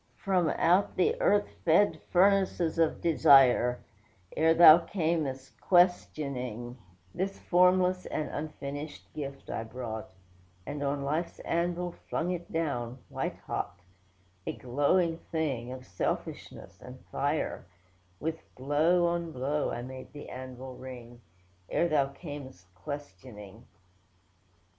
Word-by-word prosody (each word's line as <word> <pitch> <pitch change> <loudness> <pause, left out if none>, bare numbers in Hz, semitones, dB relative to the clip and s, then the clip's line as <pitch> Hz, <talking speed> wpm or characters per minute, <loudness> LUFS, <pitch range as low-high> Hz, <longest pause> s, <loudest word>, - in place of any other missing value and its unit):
'From 185 -4 +1
out 180 +4 +3
the 185 - +3
earth 205 0 +3 0.2
fed 165 -1 +3
furnaces 185 -3 +3
of 165 -1 +2
desire, 135 -6 +5 0.5
(Ere 160 +1 +4
Thou 165 -1 +10
cam'st 160 -7 -2
questioning,) 140 - +1 0.4
This 195 +2 -2
formless 180 +1 +3
and 155 - -2
unfinished 145 0 -6
gift 140 -2 -6
I - - -3
brought, 110 -1 -6 0.6
And 145 0 -5
on 140 0 -1
life's 155 +5 -2
anvil 175 +1 -1 0.2
flung 175 +2 -1
it 175 -1 -5
down, 130 -7 -2
white - - -3
hot: 90 - -3 0.7
A - - -1
glowing 165 +7 +1
thing, 135 -7 -2
of 130 0 -8
selfishness 90 0 -5
and 125 +1 -11
fire, 145 - -1 0.5
With 160 +2 -3
blow 155 +7 +2
on 170 -1 -1
blow, 145 +2 -1
I 120 - -4
made 130 +1 -9
the 145 - -9
anvil 130 0 -8
ring; 120 -2 -10 0.5
(Ere 170 - +2
Thou 145 -4 +2
cam'st 140 - -9
questioning). 105 -1 -9
145 Hz, 115 wpm, -29 LUFS, 130-170 Hz, 0.7 s, Thou